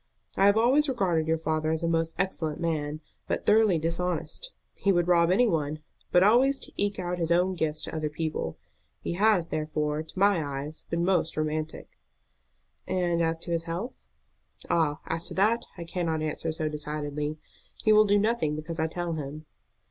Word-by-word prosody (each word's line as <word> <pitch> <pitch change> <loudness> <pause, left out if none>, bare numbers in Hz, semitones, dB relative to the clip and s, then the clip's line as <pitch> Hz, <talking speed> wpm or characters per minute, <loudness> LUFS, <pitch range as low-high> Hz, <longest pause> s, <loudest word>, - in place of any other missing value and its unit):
I 195 - +5
have 200 +1 +5
always 270 +6 +4
regarded 180 -10 +1
your 160 0 +2
father 155 -1 -1
as 160 +1 -1
a - - +1
most 165 0 0
excellent 165 -5 -2
man, 155 -2 -2 0.3
but - - -2
thoroughly 215 -4 +5
dishonest. 175 - -2 0.2
He 200 - +1
would 175 -2 +2
rob 170 -1 +4
any 225 +7 +4
one, 155 -7 0 0.3
but 180 - +5
always 255 +7 +5
to - - -7
eke 205 0 -1
out 180 -1 -3
his 165 -1 -1
own 180 +2 +3
gifts 160 -3 -1
to - - -5
other 155 -1 -1
people. 155 - -3 0.4
He - - -3
has, 195 -2 +3
therefore, 155 -1 -1
to 160 +3 -12
my 195 -4 +3
eyes 145 +2 -5
been 170 +1 0
most 175 -4 +1
romantic." 155 0 -3 0.9
"And 175 -2 +1
as 165 0 0
to 170 - -5
his 165 0 0
health?" 175 +9 -4 0.8
"Ah, 155 -2 +1
as 165 +1 -3
to - - -5
that 220 +5 +2
I 170 - -5
cannot 165 -2 -2
answer 155 +1 -2
so 155 0 -2
decidedly. 150 0 -3 0.5
He 215 - +5
will 215 0 +7
do 205 0 +4
nothing 205 -8 +1
because 160 +2 -6
I 160 - +2
tell 175 +1 -3
him." 150 0 -6
165 Hz, 185 wpm, -27 LUFS, 155-190 Hz, 0.9 s, will